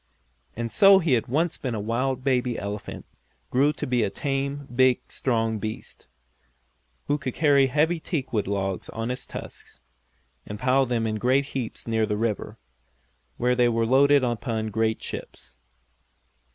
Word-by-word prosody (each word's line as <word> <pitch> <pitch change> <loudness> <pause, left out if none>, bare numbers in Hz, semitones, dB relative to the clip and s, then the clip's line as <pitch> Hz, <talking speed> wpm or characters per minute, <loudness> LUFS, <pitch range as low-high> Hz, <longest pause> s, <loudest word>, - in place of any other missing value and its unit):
And 115 0 -4
so 195 -1 +7
he 165 -5 0
who - - +6
had 115 - -4
once 160 +6 0
been 125 -6 -3
a - - -3
wild 125 +5 -1
baby 125 -3 +1
elephant, 100 +1 -6 0.5
grew 140 +4 +3
to - - -4
be 125 -1 +1
a 105 - +1
tame, 140 +3 -3
big 130 -1 +4
strong 115 -3 0
beast, 110 +1 -7 1.0
who 145 +1 0
could 130 -3 -4
carry 140 -3 +4
heavy 155 +5 +1
teakwood 130 - -2
logs 95 -2 -2
on 115 +1 -4
his 125 - -4
tusks, - - -10 0.6
and 105 - -7
pile 130 +3 +2
them 115 -2 0
in 110 -1 -1
great 130 +4 +2
heaps 125 -4 -5
near 110 -1 +1
the 105 -1 -1
river, 110 -1 -2 0.8
where 125 +1 +2
they 125 -1 +3
were 115 -1 +1
loaded 140 +3 +5
upon 115 -2 -2
great 110 +1 0
ships. - - -8
125 Hz, 160 wpm, -25 LUFS, 110-135 Hz, 1.0 s, so